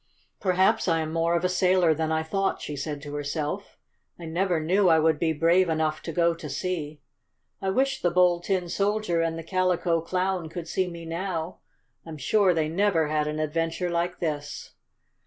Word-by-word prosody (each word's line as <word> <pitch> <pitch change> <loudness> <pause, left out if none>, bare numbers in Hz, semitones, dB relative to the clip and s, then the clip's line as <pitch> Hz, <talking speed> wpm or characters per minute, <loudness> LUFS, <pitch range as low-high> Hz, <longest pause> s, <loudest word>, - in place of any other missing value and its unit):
"Perhaps 190 +4 +2
I 165 -2 +2
am 155 0 -4
more 165 +1 +1
of 170 - 0
a - - +3
sailor 180 -2 +3
than 160 +1 -2
I 160 0 +1
thought," 195 +4 -1
she 150 - -5
said 145 0 -5
to 145 -1 -7
herself. 145 +6 -4 0.4
"I 170 - -9
never 175 +1 0
knew 180 +4 +3
I 160 - +6
would 160 -1 +2
be 165 -1 +1
brave 170 +4 +3
enough 155 -1 0
to 165 - -5
go 170 +1 +2
to 165 -2 -8
sea. 155 -1 -4 0.6
I 195 - -1
wish 265 +7 +1
the 175 - +2
Bold 175 0 +3
Tin 185 -3 0
Soldier 200 -2 0
and 165 0 -1
the 165 - -6
Calico 180 -1 +1
Clown 180 0 -1
could 170 0 -6
see 185 +2 -1
me 170 -1 -8
now. 170 0 -4 0.4
I'm 160 -2 -8
sure 195 +7 +3
they 160 -3 +1
never 165 -2 +1
had 150 -1 0
an 150 0 -3
adventure 165 +3 -1
like 175 +1 -1
this!" 150 -3 -4
170 Hz, 195 wpm, -26 LUFS, 160-185 Hz, 0.6 s, I